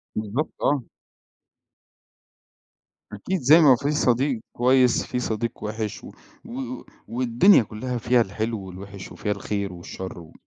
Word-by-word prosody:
بالضبط 110 +8 -2
آه. 140 -4 +1 2.3
أكيد 165 - -3
زي 150 +6 +7
ما 135 -4 +7
في 140 +5 -1
صديق 130 -3 +1
كويس 125 0 +3
في 125 - -3
صديق 115 -1 -3
وِحِش 110 0 -4
و - - -10 0.3
و 255 +2 -6 0.3
والدنيا 125 - +4
كُلّها 120 +4 -5
فيها 120 +1 +3
الحلو 110 +2 -2
والوِحش 95 +1 -9
وفيها 105 - -3
الخير 100 -1 -3
والشر 90 +1 -8
و 80 - -14
115 Hz, 125 wpm, -24 LUFS, 105-130 Hz, 2.3 s, زي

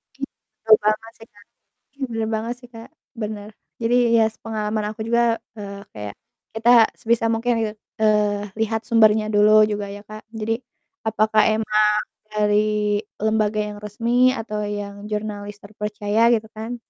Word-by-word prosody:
Oke, 275 - -11 0.4
betul 220 -1 +8
banget 215 +2 0
sih, 225 - -13
Kak. 205 0 -20 0.4
Oke, 285 - -39
bener 225 -1 -2
banget 230 +3 -2
sih, 245 - -14
Kak, 225 +3 -10 0.3
bener, 210 -1 -5 0.3
jadi, 240 +2 +2 0.2
ya, 225 - +5
sepengalaman 215 -1 -3
aku 220 - -14
juga, 235 +1 +3 0.4
eee, 200 -1 -7
kayak 105 -1 -6 0.4
kita 230 +2 +2 0.3
sebisa 230 0 +1
mungkin 235 +2 0
gitu, 215 -1 -2 0.3
eee, 210 -1 +2
lihat 225 0 0
sumbernya 220 -2 +4
dulu 215 +1 +6
juga 205 -1 -3
ya, 205 0 -9
Kak, 215 +1 -10
jadi 225 +1 -2 0.5
apakah 215 0 +3
emang 215 -1 +2 0.5
dari 210 0 +1 0.2
lembaga 215 -1 +1
yang 210 0 -4
resmi 235 +5 +2
atau 215 -4 -4
yang 205 0 -5
jurnalis 205 -1 -4
terpercaya, 210 +1 -2
gitu 220 -1 -2
kan, 225 +3 -5
215 Hz, 150 wpm, -22 LUFS, 210-225 Hz, 0.5 s, betul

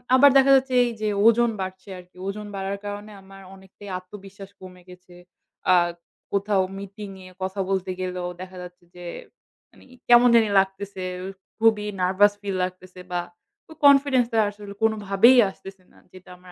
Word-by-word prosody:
আবার 285 +2 +7
দেখা 270 0 +5
যাচ্ছে, 265 -1 +1
এই 240 - -2
যে 215 - 0 0.2
ওজন 235 +1 +4
বাড়ছে 190 +1 -7
আরকি। 180 0 -18
ওজন 210 +1 -5
বাড়ার 195 +1 -4
কারণে 205 +1 -7
আমার 195 0 -15
অনেকটাই 190 +1 -14
আত্মবিশ্বাস 195 +1 -12
কমে 180 -1 -13
গেছে। 180 0 -16 0.6
আ - - +7 0.6
কোথাও 200 0 +1 0.2
মিটিং 200 +1 -9 0.2
এ - - -11
কথা 190 +1 -4
বলতে 190 -1 -1
গেলেও, 180 -1 -4
দেখা 185 0 -10
যাচ্ছে 180 0 -13
যে, 175 - -11 0.7
মানে - - -20 0.3
কেমন 240 0 +7
জানি 225 -2 +4
লাগতেছে। 195 0 -3 0.6
খুবই 220 -2 +3 0.2
নার্ভাস 190 +3 +3
ফীল 200 -2 -4
লাগতেছে, 185 0 -7
বা 175 0 -1 0.5
ওই 320 - -12
কনফিডেন্সটা, 270 -4 +4
আসলে 205 -1 -11
কোনোভাবেই 220 +2 +4
আসতেছে 195 0 -13
না। - - -23 0.2
যেটা 185 -1 -15
আমার 180 0 -16
195 Hz, 155 wpm, -23 LUFS, 185-215 Hz, 0.7 s, আবার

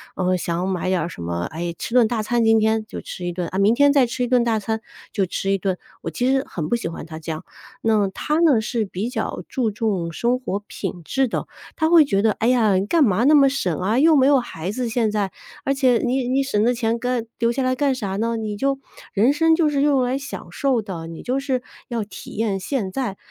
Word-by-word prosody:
呃， 185 0 +1
想 175 +1 -2
买 185 -1 -1
点 180 -3 0
什 170 - -9
么 85 +1 -3
哎， 170 +2 -3
吃 - - -5
顿 245 -3 +5
大 225 -2 -1
餐 240 +2 +1
今 225 0 +5
天 220 0 +2
就 - - -7
吃 180 - -6
一 - - -1
顿 175 0 -3
啊， 190 - -3
明 205 +4 +4
天 285 +2 +5
再 270 -4 +4
吃 250 +2 -2
一 - - 0
顿 245 -1 +3
大 230 -2 +1
餐 220 +2 -3 0.3
就 205 - +1
吃 195 +2 -2
一 195 - +1
顿。 185 -1 -1 0.2
我 - - -4
其 245 - -2
实 270 0 +2
很 155 -4 -4
不 - - +1
喜 235 - -3
欢 165 - -7
他 160 -1 -8
这 160 +1 -5
样， 155 0 -6 0.4
那 215 -3 +3
他 300 +10 -1
呢， 310 -9 +5
是 225 0 -1
比 195 +3 -4
较 240 -3 -3
注 245 -4 0
重 200 -5 -2
生 240 +9 0
活 205 -6 -3
品 175 - -5
质 265 - +1
的。 - - -3 0.3
他 315 0 +1
会 330 -3 +7
觉 195 -8 +1
得， 220 - +4
哎 225 - -1
呀， 230 -5 +4
你 190 +1 +1
干 330 +3 +4
嘛 220 -2 +2
那 300 +2 +6
么 275 -2 +6
省 190 - -1
啊， 210 +7 +1
又 315 +2 +6
没 265 -2 +5
有 280 -1 +5
孩 185 -7 -5
子 245 +3 -2
现 225 -2 +1
在， 205 -2 -1 0.3
而 275 - +2
且 260 -3 +3
你 255 0 0
你 265 +2 +2
省 240 -7 0
的 245 +2 +3
钱 230 -1 0
干 245 -1 -1
留 235 0 +2
下 265 - -2
来 255 0 +1
干 280 0 +1
啥 200 -7 -3
呢？ 230 +3 -1
你 215 -2 -3
就 275 +3 0 0.3
人 225 +7 +4
生 325 +2 +4
就 320 -2 +2
是 285 -2 0
用 285 -2 +3
来 250 +1 0
享 275 0 -7
受 265 -4 +1
的， 185 -6 -6
你 165 -1 -8
就 255 +2 -1
是 265 -2 -1 0.3
要 235 -3 -1
体 205 - -10
验 210 -3 -1
现 195 -1 -2
在。 235 -4 -3
230 Hz, 275 characters per minute, -22 LUFS, 195-260 Hz, 0.4 s, 会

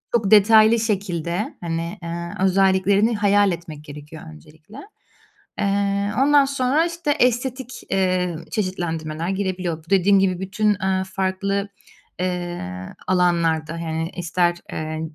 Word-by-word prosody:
Çok 215 -4 +1
detaylı 220 +2 +6
şekilde, 195 -3 -2
hani, 170 +2 -4
eee, 170 +1 -5
özelliklerini 195 +3 +3
hayal 205 -1 +3
etmek 165 -3 -7
gerekiyor 150 +2 -11
öncelikle. 155 - -16 0.8
Eee, 200 0 0
ondan 285 +1 +5
sonra, 275 +4 +1
işte, 340 -3 -2
estetik, 255 -1 -1
eee, 185 -2 +1 0.2
çeşitlendirmeler 165 -4 -3
girebiliyor. 185 -4 -2
Bu - - -22
dediğim 195 +1 +4
gibi 185 -2 +1
bütün, 205 +3 0
eee, 190 0 0
farklı, 195 +1 -1 0.5
eee, 175 - -4
alanlarda, 170 -3 +1
yani, 160 0 -3
ister, 175 0 0 0.2
eee, 155 0 -4
190 Hz, 115 wpm, -22 LUFS, 170-205 Hz, 0.8 s, detaylı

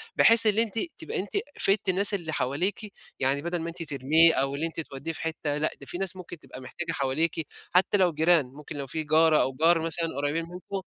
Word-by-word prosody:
بحيث 230 -1 +5
اللي 215 +2 +5
أنتِ 225 0 -4 0.2
تبقى 325 - -4
أنتِ 195 +1 -5 0.3
فدتِ 195 0 +2
الناس 200 +3 +3
اللي 170 -5 -3
حواليكِ، 180 - -2 0.3
يعني 135 +2 +1
بدَل 170 +2 -3
ما 165 - -4
أنتِ 170 0 -6
ترميه 155 +3 +5
أو 135 +1 -1
اللي 150 +3 -2
أنتِ 165 - -7
توديه 150 +1 -5
في - - -8
حتّة 160 -2 -3
لأ 155 +1 0
ده 140 - -10
فيه 175 - -6
ناس 195 -1 -2
ممكن 175 -2 -10
تبقى 130 - -12
محتاجة 170 +6 -5
حواليكِ، 155 +2 -1 0.2
حتى 185 +3 +3
لو 180 -3 +2
جيران، 160 -1 +3
ممكن 145 +4 -11
لو 140 -1 -5
فيه 155 +4 -3
جارة 155 0 +4
أو 135 - -1
جار 165 +3 +2
مثلًا 165 0 0
قريّبين 145 +3 -1
منكم 185 +2 -6
165 Hz, 220 wpm, -26 LUFS, 145-180 Hz, 0.3 s, بحيث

